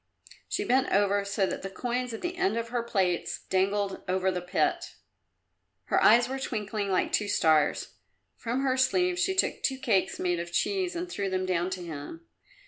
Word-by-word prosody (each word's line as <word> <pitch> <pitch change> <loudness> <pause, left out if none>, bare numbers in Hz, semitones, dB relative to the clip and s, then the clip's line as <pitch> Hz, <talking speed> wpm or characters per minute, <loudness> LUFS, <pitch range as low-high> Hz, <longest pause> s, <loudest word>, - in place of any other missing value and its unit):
She - - -1
bent 260 +2 +2
over 200 0 +3
so 200 0 0
that - - -4
the 195 - -5
coins 245 +4 -3
at 225 - -6
the 350 +1 -3
end 380 -6 0
of 230 0 -3
her 240 0 -1
plaits 190 -7 -1
dangled 195 +1 0
over 190 +1 +1
the 180 -1 -3
pit. 180 -3 -1 0.9
Her - - +1
eyes 235 +3 +6
were 265 +1 -4
twinkling 210 -5 -3
like 185 - +1
two 210 - +1
stars. 155 -6 +2 0.4
From 245 +3 -2
her 260 -1 +1
sleeve 360 +7 +2
she 380 0 +1
took 380 - +1
two 265 - 0
cakes 230 -8 +1
made 175 -1 0
of 170 0 -5
cheese 370 - 0
and 345 +1 -3
threw 200 - -3
them 185 0 -1
down 180 -1 0
to 185 -1 -5
him. 170 - -8
205 Hz, 190 wpm, -28 LUFS, 185-260 Hz, 0.9 s, eyes